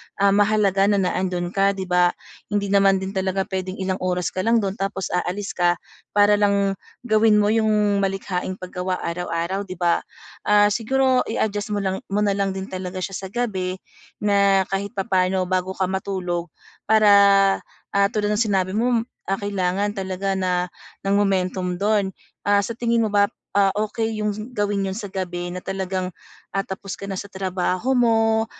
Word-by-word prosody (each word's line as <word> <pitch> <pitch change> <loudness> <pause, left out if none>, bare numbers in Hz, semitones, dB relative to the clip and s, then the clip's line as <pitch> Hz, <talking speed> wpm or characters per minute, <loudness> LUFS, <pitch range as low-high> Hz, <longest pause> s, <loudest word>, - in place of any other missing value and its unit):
ah, 200 0 +3
mahalaga 200 -1 +3
na 205 - +3
na 190 -2 +1
ando'n 180 -2 -2
ka, 195 0 +2
'di 190 - -4
ba? 180 -1 +2 0.3
Hindi 205 -1 -1
naman 195 -1 +5
din 190 0 -3
talaga 190 0 -1
puwedeng 190 -1 -4
ilang 190 -1 -2
oras 180 -1 -1
ka - - -5
lang 230 +3 +2
do'n 195 +1 -3
tapos 195 -1 -3
aalis 185 +3 -2
ka 175 -1 +2 0.4
para 205 0 +5
lang 200 -1 +2 0.2
gawin 220 -2 +4
mo 210 0 +3
yung 210 -2 +2
malikhaing 190 -1 -2
paggawa 185 0 -4
araw-araw, 175 +3 -2
'di 185 - -6
ba? 175 -1 +2 0.5
Ah, 205 0 +5
siguro 260 +4 +2
i-adjust 205 0 -1
mo 205 - -1
lang 190 0 -1
mo 200 +1 -1
na 200 -1 +1
lang 195 -1 0
din 190 +1 -6
talaga 185 0 -5
siya 195 +1 -3
sa 190 - -6
gabi 190 -6 -2 0.4
na 200 -1 +4
kahit 200 +2 -3
papa'no 185 -2 0
bago 185 0 0
ka 190 -1 -1
matulog, 185 -3 -2 0.4
para, 215 -1 +5 0.8
ah, 200 0 +3
tulad 210 -1 0
ng 210 - +1
sinabi 190 -1 0
mo, 235 0 +2 0.2
ah, 195 +1 -2
kailangan 200 0 0
talaga 190 0 -2
na 180 -1 0 0.3
ng 195 0 +1
momentum 185 -2 0
do'n. 205 -2 +1 0.3
Ah, 205 0 +4
sa 225 +3 -5
tingin 235 -1 +1
mo 220 - +1
ba, 205 0 +4 0.3
ah, 195 -1 +4 0.2
okey 220 -1 -2
yung 210 +3 -3
gawin 205 -3 0
yun 190 - -2
sa 205 0 -6
gabi 175 -2 -4
na 180 +1 -7
talagang, 190 -1 -3 0.4
ah, 195 - +1
tapos 195 0 -6
ka 200 - -7
na 195 - -3
sa - - -5
trabaho 190 +5 -1
mo, 225 -2 +3
195 Hz, 175 wpm, -22 LUFS, 185-205 Hz, 0.8 s, naman